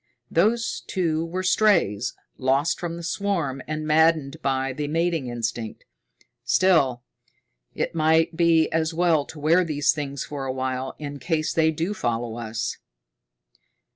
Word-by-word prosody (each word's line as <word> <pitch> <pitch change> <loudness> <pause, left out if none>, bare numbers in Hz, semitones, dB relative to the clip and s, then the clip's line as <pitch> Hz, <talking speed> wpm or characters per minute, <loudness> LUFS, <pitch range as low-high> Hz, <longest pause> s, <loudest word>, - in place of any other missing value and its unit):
"Those 220 +7 +1
two 165 -4 0
were 180 +3 -3
strays, 175 - +2 0.2
lost 135 +5 +1
from 170 -1 -4
the 170 - -8
swarm 165 -7 -1
and 155 0 -3
maddened 155 -2 +2
by 135 -1 0
the 145 +2 -3
mating 165 -2 0
instinct. 115 -2 -4 0.6
Still, 140 -10 +3 0.7
it - - -2
might 160 +1 +2
be 165 -1 +4
as 160 0 0
well 165 -4 +2
to 160 - -10
wear 165 +5 +4
these 150 -4 +2
things 140 -3 -4
for 140 -2 -5
a - - -1
while, 130 0 -3
in 145 -1 -6
case 160 -1 -1
they 160 -1 +3
do 165 +5 -2
follow 120 - -2
us." 115 0 -3
155 Hz, 140 wpm, -24 LUFS, 135-170 Hz, 0.7 s, be